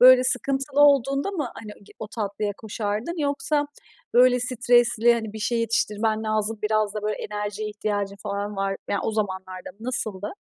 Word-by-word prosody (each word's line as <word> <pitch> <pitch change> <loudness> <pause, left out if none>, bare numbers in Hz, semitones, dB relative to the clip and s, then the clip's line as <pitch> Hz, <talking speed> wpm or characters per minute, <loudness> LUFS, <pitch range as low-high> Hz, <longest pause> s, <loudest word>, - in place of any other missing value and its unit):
Böyle 255 0 +8
sıkıntılı 270 +2 0
olduğunda 280 +3 +4
mı 310 -10 -2
hani 215 -2 -9
g - - -17
o 220 - -5
tatlıya 210 -1 -3
koşardın 220 - -3
yoksa, 290 0 0 0.5
böyle, 250 0 +6
stresli, 240 -1 +3
hani, 220 -2 -4
bir 220 - -7
şey 235 +2 0
yetiştirmen 220 -1 0
lazım, 215 0 -1
biraz 215 -1 +1
da 210 - -4
böyle 210 0 -1
enerjiye 210 0 -3
ihtiyacın 205 -1 -2
falan 205 0 -4
var 195 0 -1
yani, 200 - +1
o - - 0
zamanlarda 190 -4 -3
mı, - - -34
nasıldı? 215 -5 -3
220 Hz, 165 wpm, -25 LUFS, 205-250 Hz, 0.5 s, Böyle